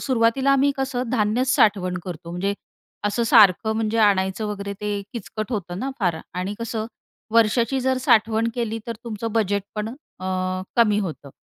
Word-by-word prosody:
सुरुवातीला 260 +2 +2
आम्ही 275 +1 +4
कसं 255 -3 -2
धान्य 225 +1 +1
साठवण 205 -9 +2
करतो. 170 -2 -7
म्हणजे 195 +3 -1 0.5
असं 205 +3 +1
सारखं 215 -1 +5
म्हणजे 225 0 0
आणायचं 200 0 +2
वगैरे 200 -1 -4
ते 205 -1 -2
किचकट 220 0 -5
होतं 180 -3 -3
ना 270 +4 -2
फार 175 -5 +1 0.2
आणि 185 +3 -3
कसं 225 -1 -3 0.5
वर्षाची 230 +3 +3
जर 260 0 +1
साठवण 225 -2 +3
केली 225 -2 -2
तर 230 - -3
तुमचं 225 -1 -4
बजेट 205 -3 +1
पण 210 +1 -2 0.3
अ, - - -6 0.5
कमी 210 -3 +4
होतं. 160 -8 -5
215 Hz, 155 wpm, -23 LUFS, 200-235 Hz, 0.5 s, सारखं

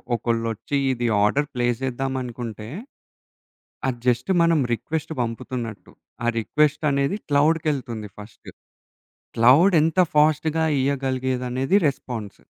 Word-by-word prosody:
ఒకళ్ళొచ్చి, 115 +3 -2
ఇది 120 -2 -2 0.2
order 140 +8 +2
play 120 -2 0
చేద్దామనుకుంటే 125 -4 -4 1.2
అది 125 -2 -2
just 125 +4 +1
మనం 165 -1 +3
రిక్వెస్ట్ 160 +7 -4
పంపుతున్నట్టు. 115 -2 -5 0.3
ఆ - - +1
రిక్వెస్ట్ 150 +7 +1
అనేది 140 +7 0
క్లౌడ్‌కెల్తుంది 145 -7 0
ఫస్ట్. 105 +2 -12 0.9
క్లౌడ్ 145 +11 +6
ఎంత 165 +3 +2 0.2
ఫాస్ట్‌గా 155 +1 +3 0.2
ఇయగలిగేదనేది 130 +2 0
రెస్పాన్స్. 120 -6 -6
130 Hz, 95 wpm, -23 LUFS, 120-150 Hz, 1.2 s, క్లౌడ్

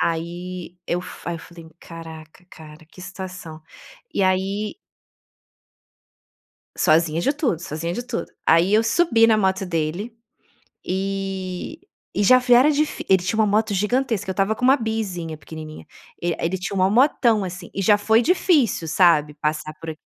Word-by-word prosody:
Aí 175 +2 -4
eu 175 - -1
f - - -9
aí 170 - -2
eu - - -11
falei: 170 -1 -13
"Caraca 160 0 -11
cara, 155 0 -13
que - - -15
situação." 180 -4 -8 0.5
E 200 - +1
aí 195 +3 0 2.0
Sozinha 160 +1 +2
de 275 - +1
tudo, 275 - -1
sozinha 165 +1 -4
de 240 - -4
tudo. 245 -1 -4 0.2
Aí 170 +5 +4
eu 220 - +5
subi 230 -2 +3
na 220 -1 +4
moto 190 -1 0
dele, 175 +7 -3 0.7
e 195 - -4 0.3
e 205 - 0
já 255 +4 +7
vi 250 -1 +3
era 255 +5 +6
dif 300 0 -1
ele 190 -2 +4
tinha 220 +4 -1
uma 215 - +4
moto 210 +1 +1
gigantesca, 220 +1 0
eu 190 - -3
tava 195 +2 +1
com 220 - -9
uma 265 +2 +6
Bizinha, 200 - -4
pequenininha. 155 0 -10 0.4
Ele 170 -1 -1
ele 175 +3 -1
tinha 185 +2 -5
mó 185 0 +3
motão, 235 -2 +3
assim. 180 -1 -7
E 195 - -3
já 205 +1 +4
foi 220 +3 +3
difícil, 295 - +2
sabe 155 -3 +3
passar 155 +1 -3
por 165 - -7
a - - -7
190 Hz, 165 wpm, -22 LUFS, 165-220 Hz, 2.0 s, já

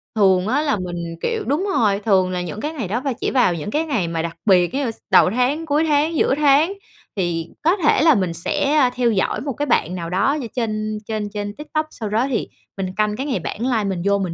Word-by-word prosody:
thường 190 -2 +3
á 280 +6 +1
là 290 -8 +1
mình, 175 -2 -5
kiểu 450 -3 -1
đúng 325 +9 0
rồi, 205 -3 +2
thường 190 -3 +2
là 180 -1 -2
những 180 +5 -6
cái 305 +2 -3
ngày 235 - -4
đó 230 +6 -2
và 275 -1 -1
chỉ - - -3
vào 245 -9 +3
những 170 +4 -5
cái 315 +5 0
ngày 230 - -1
mà 165 -1 -2
đặc 165 0 -4
biệt 180 -1 +4
giống 280 - 0
như 230 - -1
s - - -15
đầu - - +6
tháng, 255 +8 0
cuối 300 0 +1
tháng, 300 +2 +2
giữa 270 - +2
tháng, 300 +5 +4 0.4
thì 170 -4 -2
có 335 +4 +4
thể 305 -7 +3
là 315 -2 +6
mình 185 -4 0
sẽ, 275 - 0
ơ, 265 -4 +5
theo 245 -2 +2
dõi 195 - 0
một 275 -1 -3
cái 290 +4 -2
bạn 185 - +1
nào 170 -2 -5
đó 195 +10 +2
như 235 - -5
trên 215 -2 -2
trên 215 -2 -3
trên 205 0 -5
TikTok, 305 +1 -3
sau 220 -7 -6
đó 225 +5 +1
thì 235 - -1 0.3
mình 195 -1 -2
canh 210 -1 +1
cái 265 +5 -4
ngày 275 -4 -1
bản 215 - -6
live 230 -4 +1
mình 190 -3 -2
vô 200 0 +3
mình 185 -4 -2
220 Hz, 260 wpm, -21 LUFS, 190-285 Hz, 0.4 s, đầu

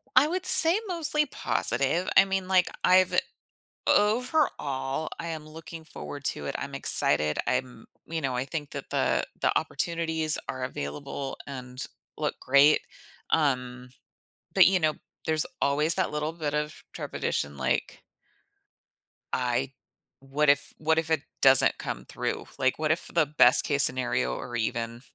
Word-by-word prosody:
I 275 +4 +6
would 370 +2 -3
say 340 +3 +8
mostly 310 -4 0
positive. 150 - 0
I - - +8
mean, 190 -1 -2
like, 185 -1 +3 0.2
I've 185 0 +4 0.7
overall, 205 - 0
I 170 - -5
am 155 -2 -6
looking 160 +1 -10
forward 145 -2 -9
to 75 - -1
it, - - -4
I'm - - -6
excited, 75 0 +1
I'm 125 -2 -3 0.2
you 160 -1 -4
know, 130 -2 -2
I 125 +2 -2
think 145 0 -6
that - - -7
the - - 0 0.2
the - - +2
opportunities 160 -2 0
are 130 -1 -4
available, 135 - -6
and 125 -2 -7 0.3
look - - -2
great, 140 +3 +4 0.5
um, 125 -4 -1 0.6
but, - - +6
you 190 -1 +2
know, 155 -2 +1 0.3
there's 155 -1 0 0.2
always 150 +3 +2
that - - -1
little 150 +1 -2
bit 155 -3 -4
of 150 0 -4
trepidation 70 -1 -3
like 65 -1 -2 1.3
I 125 +1 -1 0.5
what 140 +2 0
if 145 0 +1
what 160 +1 +1
if 160 0 -1
it 160 - +1 0.2
doesn't 135 -1 +6
come - - -6
through? - - -4
Like, 130 +2 0
what 155 0 0
if 160 - -1
the 165 -2 +3
best 150 +1 +5
case 140 -1 +3
scenario, 120 - +2
or 120 - -7
even 115 +1 -3
150 Hz, 150 wpm, -26 LUFS, 130-165 Hz, 1.3 s, say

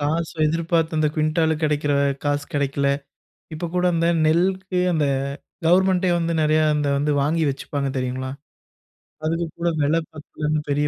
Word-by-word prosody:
காசோ 160 +3 -1
எதிர்பார்த்து 165 0 0
அந்த 155 - +3
குவிண்டால 160 +1 +1
கிடைக்கிற 150 -1 +1 0.3
காசு 145 0 0
கிடைக்கல. 140 -1 0 0.7
இப்ப 165 +2 -4
கூட 180 0 +1
அந்த 165 0 +1 0.2
நெல்க்கு 185 +3 +1
அந்த 155 -3 +1 0.6
கவர்ன்மென்ட்டே 185 +1 +3
வந்து 170 0 -1
நெறைய 155 +1 +3
அந்த 150 -1 0
வந்து 150 +1 +1
வாங்கி 160 +3 +1
வச்சுப்பாங்க 140 0 -3
தெரியுங்களா, 130 +1 -3 1.0
அதுக்கு 165 +1 0
கூட 170 - +1
வில 150 +3 +2 0.2
பத்தலனு 155 0 -3
பெரிய 145 +1 +1
155 Hz, 140 wpm, -22 LUFS, 145-170 Hz, 1.0 s, அந்த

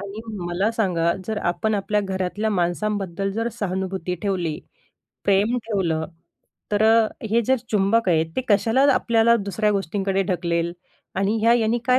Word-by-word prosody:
आणि 200 +2 -7
मग 210 -5 -6
मला 190 +5 0
सांगा, 175 -6 +1
जर 220 -1 -2
आपण 175 +5 0
आपल्या 210 +1 0
घरातल्या 195 +2 -2
माणसांबद्दल 195 0 -1
जर 230 +2 -1
सहानुभूती 190 -2 -2
ठेवली, 180 -6 -1 0.7
प्रेम 205 +5 +3
ठेवलं, 175 -7 0 0.7
तर 205 +1 +2
अ, 225 0 +5 0.2
हे 230 - +4
जे 265 +2 +3
चुंबक 210 +1 +2
आहेत 160 -2 +3
ते - - +2
कशाला 225 +5 +3
आपल्याला 235 0 +3
दुसऱ्या 210 +1 -1
गोष्टींकडे 195 0 -1
ढकलेल 170 -2 0 0.4
आणि 200 +3 +1
ह्या 230 +1 +5
यानी 230 0 +1
काय 255 0 +5
200 Hz, 150 wpm, -23 LUFS, 180-220 Hz, 0.7 s, अ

